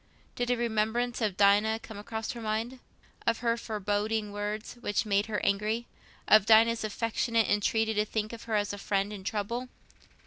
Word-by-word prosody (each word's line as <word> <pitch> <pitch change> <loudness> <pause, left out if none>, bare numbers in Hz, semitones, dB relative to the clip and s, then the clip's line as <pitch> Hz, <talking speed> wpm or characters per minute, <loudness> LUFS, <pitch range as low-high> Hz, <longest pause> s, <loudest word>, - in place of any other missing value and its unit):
Did 245 0 -2
a 245 - +2
remembrance 235 +1 0
of 205 -4 0
Dinah 205 +2 +4
come 220 -2 -9
across 220 +1 -4
her 235 - -7
mind? 225 +4 -2 0.5
Of 230 -1 +1
her 230 -1 +2
foreboding 210 -1 -2
words, 210 +1 -4
which 205 -4 0
had 215 - -10
made 200 +1 +3
her 215 -2 -1
angry? 215 +4 0 0.4
Of 215 -1 +6
Dinah's 225 +1 +5
affectionate 230 +1 0
entreaty 220 +2 +1
to 210 0 +1
think 215 +1 -3
of 230 - -9
her 225 -2 -1
as 205 -1 0
a 205 - -6
friend 200 +1 -1
in 195 -2 -8
trouble? 230 +5 -3
220 Hz, 180 wpm, -29 LUFS, 205-230 Hz, 0.5 s, Of